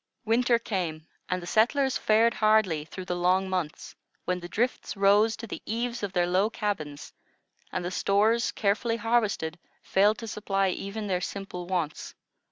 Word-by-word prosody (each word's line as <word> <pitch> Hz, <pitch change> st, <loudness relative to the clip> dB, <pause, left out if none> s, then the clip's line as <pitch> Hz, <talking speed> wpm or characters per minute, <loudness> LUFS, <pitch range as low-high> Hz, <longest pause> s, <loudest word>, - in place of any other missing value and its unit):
Winter 235 Hz, +2 st, +3 dB
came, 175 Hz, -9 st, -3 dB, 0.2 s
and 185 Hz, -1 st, -1 dB
the -, -, -6 dB
settlers 255 Hz, +7 st, +2 dB
fared 225 Hz, +2 st, +3 dB
hardly 215 Hz, -9 st, +2 dB
through 185 Hz, +3 st, -8 dB
the 180 Hz, -, -2 dB
long 185 Hz, +2 st, +2 dB
months, 180 Hz, -3 st, -3 dB, 0.3 s
when 180 Hz, 0 st, -1 dB
the 175 Hz, 0 st, -8 dB
drifts 235 Hz, +1 st, -1 dB
rose 205 Hz, +3 st, +4 dB
to 230 Hz, -, -7 dB
the 220 Hz, -, -7 dB
eaves 235 Hz, +2 st, -3 dB
of 205 Hz, -2 st, -3 dB
their 175 Hz, -2 st, +2 dB
low 185 Hz, +4 st, +2 dB
cabins, 170 Hz, -11 st, -4 dB, 0.6 s
and 180 Hz, -1 st, -3 dB
the 175 Hz, -, -3 dB
stores, 215 Hz, +5 st, +2 dB
carefully 220 Hz, +3 st, 0 dB
harvested, 215 Hz, -8 st, 0 dB, 0.2 s
failed 205 Hz, +3 st, +3 dB
to 230 Hz, -, -7 dB
supply 195 Hz, -2 st, 0 dB
even 200 Hz, +3 st, -4 dB
their 185 Hz, -3 st, -1 dB
simple 180 Hz, -2 st, -5 dB
wants. 175 Hz, -5 st, -3 dB
200 Hz, 165 wpm, -27 LUFS, 180-225 Hz, 0.6 s, rose